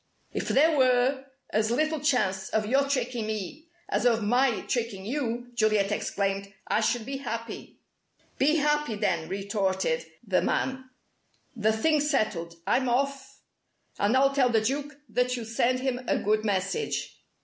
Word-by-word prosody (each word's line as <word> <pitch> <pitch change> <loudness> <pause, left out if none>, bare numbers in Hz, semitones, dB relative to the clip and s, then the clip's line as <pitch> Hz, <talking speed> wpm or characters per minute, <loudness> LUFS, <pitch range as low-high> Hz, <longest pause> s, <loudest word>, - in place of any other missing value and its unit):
"If - - -3
there 310 +3 +4
were 260 0 +3 0.3
as 215 +1 +1
little 310 +6 +1
chance 210 -10 +1
of 220 -1 0
your 275 +5 +2
tricking 245 -4 -1
me, 220 - -5 0.2
as - - 0
of 230 -2 +2
my 245 +2 +2
tricking 225 -6 -3
you," 245 -1 -3
Juliet 215 -3 +2
exclaimed, 195 -1 -2
"I 215 - +1
should 225 +1 0
be 270 +2 -4
happy." 230 -3 -6 0.6
"Be 300 +4 +4
happy 295 -5 +1
then!" 170 -6 -1
retorted 190 -4 -1 0.2
the 190 -3 +2
man. 260 0 -1 0.7
"The 220 -1 +2
thing's 295 +6 +2
settled. 170 - -1
I'm 260 -1 +2
off. 275 +2 -1 0.6
And 210 +6 +3
I'll 275 +1 +4
tell 265 -3 +3
the 225 -2 +3
Duke 285 +5 -2
that 250 0 0
you 235 - -5
send 235 +3 +1
him 260 -2 -1
a - - +2
good 215 +1 +1
message." 205 - -2
240 Hz, 150 wpm, -27 LUFS, 210-270 Hz, 0.7 s, there